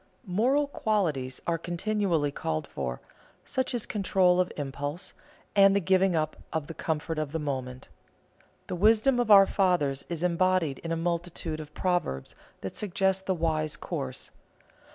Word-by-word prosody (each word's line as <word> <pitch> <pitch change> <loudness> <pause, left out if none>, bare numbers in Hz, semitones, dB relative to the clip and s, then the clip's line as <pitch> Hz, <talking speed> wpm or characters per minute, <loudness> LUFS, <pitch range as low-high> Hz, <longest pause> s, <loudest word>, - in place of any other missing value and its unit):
Moral 245 +10 +2
qualities 165 - -1
are 165 -1 0
continually 175 -3 0
called 80 - -3
for, 65 -2 -4 0.5
such 260 -1 -1
as 235 - -2
control 185 -3 +2
of 180 0 +1
impulse, 145 +4 -4 0.4
and 195 -1 +6
the - - +4
giving 190 0 +3
up 155 -1 0 0.2
of 160 -2 -2
the 165 - -7
comfort 160 0 -2
of 155 -2 -3
the - - 0
moment. 130 -4 -4 0.8
The - - -4
wisdom 220 +7 +4
of 240 -2 0
our 200 -2 +9
fathers 175 -9 +1
is 170 -1 -3
embodied 180 -4 +1
in 165 - -5
a 165 - 0
multitude 170 -1 -2
of 150 -1 -10
proverbs 175 - -1 0.3
that 95 - -6
suggest 190 -1 0
the 190 - +1
wise 155 -2 0
course. 135 -7 -5
170 Hz, 155 wpm, -28 LUFS, 150-195 Hz, 0.8 s, our